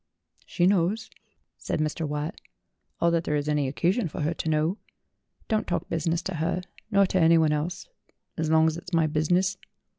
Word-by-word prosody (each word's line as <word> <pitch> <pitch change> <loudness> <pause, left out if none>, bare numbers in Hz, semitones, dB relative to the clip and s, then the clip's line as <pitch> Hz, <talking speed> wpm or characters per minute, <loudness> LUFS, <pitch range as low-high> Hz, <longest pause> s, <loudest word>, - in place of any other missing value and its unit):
"She 175 - +1
knows," 195 +4 +1 0.5
said - - -2
Mr. 155 +1 -1
Watt, 150 +5 -4 0.6
"all 170 - +3
that 170 0 +1
there 150 - -1
is 145 0 -1
any 150 -2 +1
occasion 175 - 0
for 155 - -6
her 155 +3 0
to 160 - -3
know. 155 +6 +1 0.7
Don't 215 -1 0
talk - - -2
business 165 +1 -1
to 185 -3 -4
her 165 +3 -1 0.3
nor 200 -2 +4
to 185 -1 +1
anyone 160 -1 +5
else, 160 +5 -2 0.5
as 160 -1 -1
long 160 0 +5
as 160 0 +1
it's 180 +1 -10
my 165 -1 +4
business." 175 +5 +1
165 Hz, 180 wpm, -26 LUFS, 155-180 Hz, 0.7 s, anyone